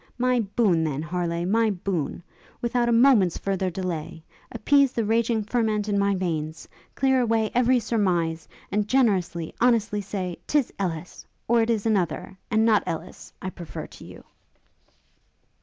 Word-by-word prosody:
My 250 0 +2
boon, 195 -5 +1
then, 150 -1 -2
Harleigh, 170 0 -2
my 225 +4 +2
boon! 175 -5 -3 0.4
without 240 0 0
a - - +2
moment's 230 -7 +4
further 190 -1 -1
delay! 170 -3 -5 0.3
Appease 280 +1 +3
the 230 - -1
raging 225 0 +1
ferment 215 -2 0
in 205 -1 +1
my 200 0 +2
veins; 160 -4 -3 0.3
clear 265 -1 +3
away 225 -2 +1
every 250 +1 +4
surmize; 175 -8 0 0.2
and 210 0 0
generously, 195 -9 +1
honestly 225 -4 +2
say 185 -3 -4
'tis 290 -4 +1
Ellis! 175 -3 -4 0.2
or 235 0 +4
it 225 - 0
is 225 -2 0
another, 195 -2 -1
and 220 -1 +3
not 220 -2 +4
Ellis, 160 - -6
I 185 - -3
prefer 170 -4 -8
to - - -14
you!' - - -12
205 Hz, 150 wpm, -25 LUFS, 175-230 Hz, 0.4 s, moment's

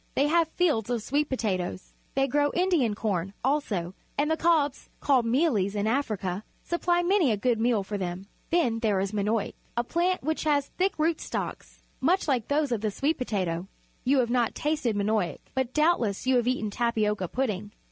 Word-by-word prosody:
They 275 - +3
have 330 +2 +3
fields 310 - +1
of 240 -3 -1
sweet 290 +4 0
potatoes. 185 -7 -2 0.2
They 270 0 +3
grow 290 +2 +2
Indian 345 - +2
corn, 195 -3 -2
also, 220 - 0 0.2
and 295 +2 +1
the - - +3
cobs, 315 -4 +1
called 260 -5 +3
mealies 230 - +2
in 205 0 0
Africa, 215 -6 -1 0.2
supply 345 0 +1
many 360 -5 +3
a 215 - +1
good 235 +1 +1
meal 225 -3 +2
for 205 +1 -4
them. 180 +1 -4 0.2
Then 255 -10 +2
there 215 -4 +1
is 195 0 -1
manioc, 210 +1 0 0.2
a 240 - +2
plant 350 +6 0
which 315 +3 -1
has 285 -2 +2
thick 380 +2 -1
root 315 +1 +1
stocks, - - -5 0.2
much 350 +8 +2
like 250 -6 +1
those 290 -1 +1
of 230 -4 0
the 215 - 0
sweet 280 +10 -1
potato. 185 -7 -2 0.4
You 275 +2 +3
have 235 -1 -1
not 240 -2 +1
tasted 295 -7 0
manioc, 205 -3 0 0.2
but 260 -2 -1
doubtless 300 - +1
you 260 0 +4
have 240 0 +1
eaten 235 -5 0
tapioca 210 -4 0
pudding. 210 -3 -2
245 Hz, 185 wpm, -27 LUFS, 210-300 Hz, 0.4 s, you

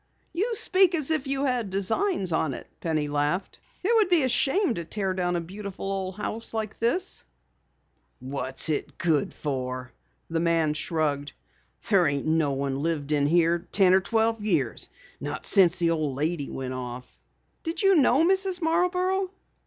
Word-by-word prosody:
"You 445 +7 0
speak 375 -3 +3
as 310 -2 -1
if 300 -3 0
you 275 +1 0
had 245 -6 0
designs 195 - 0
on 155 -4 0
it," - - -9
Penny 155 -3 -1
laughed. 145 +6 -1 0.2
"It 430 +5 +2
would 420 -4 +3
be 345 -5 +4
a 260 - +1
shame 290 - +2
to 170 - -4
tear 190 +2 -2
down 180 -1 -1
a 170 - 0
beautiful 195 +2 -6
old 190 -1 -3
house 220 +2 -4
such 220 -2 -3
as - - -23
this." 300 +12 -1 1.0
"What's 130 0 -3
it 150 - -2
good 165 -6 +1
for?" 130 -3 -4 0.4
the 165 0 -1
man 165 -2 +2
shrugged. 150 -2 -2 0.5
"There 190 -6 +4
ain't 140 -1 -1
no 155 -3 +2
one 135 0 -2
lived 155 -2 -2
here 165 +3 +3
in 170 - -16
ten 190 -3 +5
or 190 - +5
twelve 225 +1 0
years. 160 - 0 0.3
Not - - -5
since 180 -3 +5
the 170 -1 +2
old 155 -5 -1
lady 150 +1 -2
went 130 -1 -4
off." 125 0 -7 0.4
"Did 330 +3 -3
you 390 0 +6
know 285 -1 +4
Mrs. 380 0 +1
Marborough?" 360 +3 +1
185 Hz, 170 wpm, -26 LUFS, -, 1.0 s, you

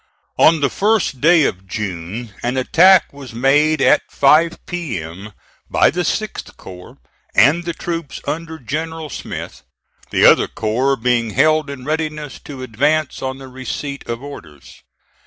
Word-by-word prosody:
On 160 -1 +5
the 140 - +3
1st 205 - 0
day 165 +1 +5
of 95 -6 -2
June 100 +3 -5
an 125 +2 -2
attack 175 +8 +5
was 135 -5 -11
made 145 +4 +3
at - - +5
five 155 +4 +3
P.M. 105 - -6 0.4
by - - +3
the 180 - -2
6th 215 +5 -3
corps 90 -1 -12 0.4
and 165 +5 +4
the 170 - -2
troops 165 -6 -5
under 160 0 -4
General 160 +3 -5
Smith, - - -7 0.5
the - - +3
other - - +6
corps 125 +6 0
being 120 -1 0
held 155 -1 +3
in 135 -3 -8
readiness 150 -2 -3
to 135 -3 -8
advance 145 +6 0
on 130 0 -3
the 135 -1 -11
receipt 130 +2 -6
of 115 +2 -4
orders. 80 - -12
140 Hz, 145 wpm, -18 LUFS, 120-160 Hz, 0.5 s, other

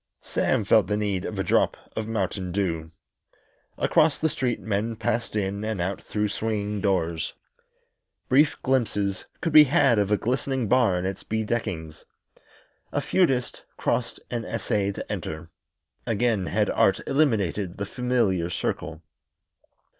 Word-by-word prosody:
Sam - - 0
felt - - +4
the 105 - 0
need 100 -3 -1
of - - -5
a - - 0
drop - - +2 0.2
of 110 -1 -3
mountain 95 -4 -2
dew. 85 -4 -1 0.9
Across 155 -2 +3
the 160 - +1
street 125 -5 -1
men 110 +2 -2
passed 115 0 -2
in 100 0 -1
and 110 -3 -2
out 95 +3 -2
through 105 0 -2
swinging 105 -1 -2
doors. 85 -5 0 0.9
Brief 145 +3 +4
glimpses 105 -7 0 0.2
could 165 - -1
be 155 -1 +10
had 135 -6 +4
of 100 -1 +1
a 105 - +4
glistening 130 +1 -1
bar 120 -5 +4
and 90 - -2
its 95 0 -3
bedeckings. 105 -8 -3 0.9
The - - 0
feudist 135 -9 +1 0.2
crossed - - -1
and 120 -2 -2
essayed 105 -3 -1
to - - -6
enter. 80 +1 -5 0.6
Again 110 -4 +1
had - - +1
Art - - +3
eliminated 105 - +1
the 100 - -3
familiar 105 -7 0
circle. 80 -2 -3
105 Hz, 140 wpm, -25 LUFS, 95-120 Hz, 0.9 s, be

